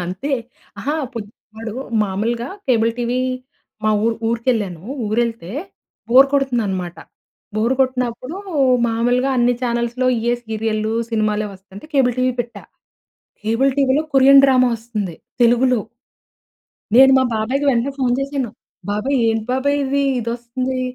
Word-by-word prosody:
అంతే 185 +11 -4 0.5
అహా! 290 +3 -2 0.2
పొ - - -5 0.4
వాడు 225 0 -6 0.3
మామూలుగా 230 +5 -2 0.2
కేబుల్ 230 -3 +3
టీవీ 245 +1 -1 0.7
మా 215 - +3
ఊ - - +3 0.2
ఊరికెళ్ళాను 225 -7 -1 0.2
ఊరెళ్తే 225 -4 -1 0.6
బోర్ 260 +3 +7
కొడుతుందనమాట. 215 -11 -1 0.6
బోర్ 230 +4 +2
కొట్టినప్పుడు 255 +4 -1 0.5
మామూలుగా 245 +3 +1
అన్నీ 245 0 +3
ఛానల్స్‌లో 235 +1 -1
ఇయే 235 +2 +1
సీరియల్‌లు 220 -1 -2 0.2
సినిమాలే 215 -1 0
వస్తంటే 195 +6 -13
కేబుల్ 255 -3 +3
టీవీ 255 0 +2
పెట్టా. 240 0 -7 0.8
కేబుల్ 230 +6 +2
టీవీలో 275 +2 +2
కొరియన్ 275 +1 +7
డ్రామా 255 -2 +4
వస్తుంది 215 -6 -5 0.3
తెలుగులో. 240 0 +4 1.1
నేను 265 +2 +8
మా 260 - +3
బాబాయికి 255 +7 -1
వెంటనే 245 +2 0
ఫోన్ 250 -2 +2
చేశాను. 275 -3 -2 0.4
బాబాయ్ 210 +7 0
ఏంటి 225 -1 0
బాబాయ్ 280 +2 +1
ఇది? 280 +1 0 0.2
ఇదొస్తుంది. 240 +3 -3
240 Hz, 120 wpm, -19 LUFS, 220-260 Hz, 1.1 s, నేను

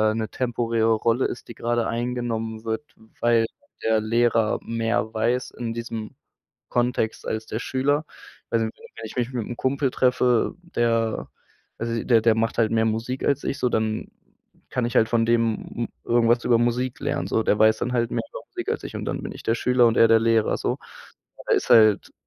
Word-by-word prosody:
'ne 110 -1 -2
temporäre 115 -2 +1
Rolle 115 +3 +1
ist, - - -5
die - - -8
gerade 120 0 -1
eingenommen 115 -2 -3
wird, 110 +2 -2 0.4
weil 120 -1 +4 0.4
der 110 -1 +2
Lehrer 115 0 +2
mehr 115 -1 -1
weiß 120 +3 0
in 115 -2 -5
diesem 115 -2 -6 0.5
Kontext 120 -2 -1
als 110 0 -3
der 110 - -4
Schüler. 145 +4 0 0.5
Also 115 -1 +1
wenn 110 - -6 0.2
wenn 115 - -7
ich - - -11
mich 125 +1 -1
mit 120 -4 -3
'm 120 - -6
Kumpel 135 +2 0
treffe, 125 -2 +2
der 115 -9 0 0.5
also, 115 0 -2
der 115 -3 +4
der 110 0 +4
macht 115 +1 -1
halt 110 -2 +3
mehr 110 0 +3
Musik 115 +4 -2
als 140 0 +1
ich 135 - -3
so, 125 - +1
dann 110 -1 -1 0.6
kann 125 - -1
ich 120 - -2
halt 110 - +4
von 115 -1 +2
dem 115 -1 +1 0.2
m - - -26 0.2
irgendwas 120 0 +3
über 120 -1 +4
Musik 120 +2 0
lernen 85 - -2
so. 110 +3 +1
Der 105 - +1
weiß 110 0 +5
dann 125 - -2
halt 120 -1 +1
mehr - - -1
über - - -7
Musik - - -6
als - - -3
ich - - -6
und - - -5
dann - - -3
bin - - -5
ich - - -10
der 115 - +1
Schüler 125 +1 +3
und 115 - +2
er 115 - +6
der 115 0 +5
Lehrer 115 -1 +2
so. - - -1 0.7
Er - - +4
ist - - -2
halt 110 -3 +5
115 Hz, 200 wpm, -24 LUFS, 110-120 Hz, 0.7 s, er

